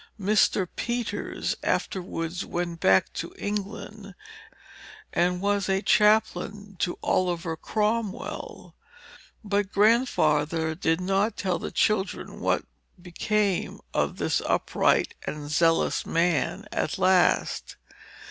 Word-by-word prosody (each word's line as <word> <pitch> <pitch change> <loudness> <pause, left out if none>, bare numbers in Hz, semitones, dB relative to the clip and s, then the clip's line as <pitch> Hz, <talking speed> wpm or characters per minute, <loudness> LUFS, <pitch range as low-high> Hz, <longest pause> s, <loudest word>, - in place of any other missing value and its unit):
Mr. 205 -1 +2
Peters 240 -1 -2
afterwards 175 -1 -2
went 170 -1 -4
back 95 -9 +3
to - - -6
England, 205 -1 -5 1.0
and 180 +1 +1
was 200 -1 0 0.2
chaplain 210 -1 +2
to 175 - -1
Oliver 170 -2 0
Cromwell; 215 +3 -3 0.7
but 200 -1 0
Grandfather 160 - +2
did 165 0 0
not 195 +4 0
tell 185 -3 -1
the - - -4
children 210 -2 -1
what - - 0 0.3
became 195 +2 -1
of - - 0
this - - 0
upright - - +2
and 150 -1 -5
zealous 165 +2 +2
man, 170 +4 0
at - - -1
last. 185 -1 +2
190 Hz, 100 wpm, -26 LUFS, 170-210 Hz, 1.0 s, back